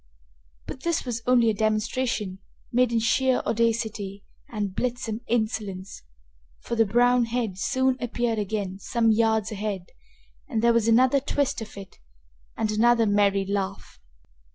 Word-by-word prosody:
But 260 - -8
this 335 -1 -1
was 235 -2 -3
only 240 -3 +4
a - - -2
demonstration, 215 -1 -1 0.3
made 250 0 +3
in 230 - +1
sheer 255 +3 +2
audacity 220 -3 -1 0.3
and 205 -4 -3
blithesome 235 -1 -3
insolence, 215 -4 -2 0.6
for 235 - -4
the 225 -2 +3
brown 245 +3 +3
head 230 -5 -3
soon 260 +3 +1
appeared 240 -2 -1
again 200 -2 -3
some 225 +2 +1
yards 220 -1 +2
ahead 200 -3 -4 0.6
and 225 -5 -1
there 235 0 +5
was 230 -1 +2
another 255 +4 +4
twist 280 -2 -1
of 215 -2 -9
it 195 -1 -11 0.6
and 215 -1 0
another 230 +2 +4
merry 200 -1 +2
laugh. 195 0 -4
225 Hz, 140 wpm, -25 LUFS, 205-240 Hz, 0.6 s, there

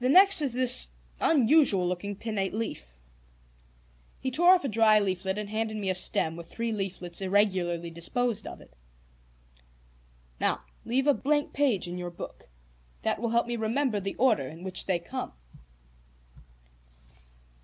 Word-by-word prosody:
"The 250 - +1
next 385 +3 +6
is 275 -5 -1
this 250 0 +6 0.3
unusual 270 - +4
looking 180 +3 -4
pinnate 205 -2 -3
leaf." 65 - -5 1.2
He 260 - -3
tore 350 +7 +6
off 355 - -2
a - - +1
dry 220 -2 +4
leaflet 190 -1 -1
and 210 -1 -4
handed 215 +1 -3
me 195 -3 -1
a - - 0
stem 165 -3 +1
with 170 0 -10
three 230 0 -3
leaflets 190 -4 -4
irregularly 185 -4 0
disposed 220 +6 -2
of - - -9
it. - - -19 1.7
"Now - - 0 0.2
leave 260 +3 0
a 290 - +5
blank 290 +2 -1
page 255 -11 +1
in 175 +1 -6
your 175 0 -5
book. 170 - -10 0.5
That - - -1
will 235 - -1
help 235 +1 +1
me 240 0 -3
remember 225 +1 0
the 195 0 -5
order 215 - +2
in 160 +5 -11
which 185 -1 -1
they 185 -2 +1
come." 170 - -6
210 Hz, 155 wpm, -27 LUFS, 185-250 Hz, 1.7 s, next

